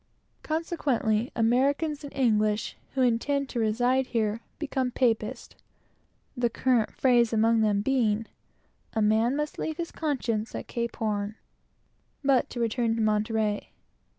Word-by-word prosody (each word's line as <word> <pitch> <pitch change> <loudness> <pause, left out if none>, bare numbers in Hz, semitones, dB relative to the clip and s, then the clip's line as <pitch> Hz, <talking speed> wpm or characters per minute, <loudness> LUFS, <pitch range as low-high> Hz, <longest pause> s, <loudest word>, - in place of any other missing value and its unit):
Consequently, 280 -9 0
the 240 - -5
Americans 280 +6 +1
and 285 - -7
English 215 -4 +1 0.2
who 260 - +3
intend 270 +4 +1
to 240 - -3
remain 245 +4 +2
here 225 -3 -1 0.2
become 270 -4 -1
Catholics, 230 -4 0
to - - -22
a - - -36
man; - - -27 0.8
the 240 -1 +2
current 240 -2 +1
phrase 240 -3 +3
among 225 0 +3
them 205 -2 +2
being, 225 -4 +1 0.7
"A 220 - 0
man 220 +4 +3
must 300 0 -3
leave 315 -1 -3
his 340 -1 -4
conscience 235 -8 -2
at - - -5
Cape 235 -1 -3
Horn." 210 -1 -2 0.9
But 270 -2 +3
to 245 - -6
return 230 0 +1
to 230 - -1
Monterey. 215 0 0
235 Hz, 150 wpm, -27 LUFS, 220-265 Hz, 0.9 s, who